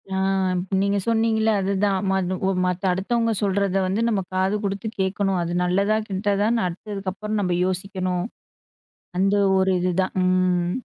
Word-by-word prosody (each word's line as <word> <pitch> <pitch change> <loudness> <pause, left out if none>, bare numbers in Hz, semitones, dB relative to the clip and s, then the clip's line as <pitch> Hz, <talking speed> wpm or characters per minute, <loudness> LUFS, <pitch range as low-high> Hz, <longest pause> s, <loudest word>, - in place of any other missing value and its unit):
ஆ - - 0 0.6
நீங்க 200 +1 +1
சொன்னிங்கள்ல, 225 -1 +2
அதுதான். 195 +1 +1
ம - - +2 0.4
ஒ - - +2
மத் 180 +1 -2
அடுத்தவங்க 230 +5 0
சொல்றத 200 -1 0
வந்து 195 +4 0
நம்ம 210 -4 +1
காது 190 +2 +1
குடுத்து 200 +2 -3
கேக்கணும், 190 0 0
அது 170 0 -2
நல்லதா 200 +4 +2
கெட்டதான்னு 205 +3 +1
அடுத்ததுக்கப்புறம் 200 +3 -4
நம்ப 180 -2 0
யோசிக்கணும் 185 -1 -2 0.9
அந்த 195 +2 +2 0.2
ஒரு 190 0 +2
இதுதான். 185 +1 0
ம். 185 -1 +1
195 Hz, 130 wpm, -23 LUFS, 185-205 Hz, 0.9 s, சொன்னிங்கள்ல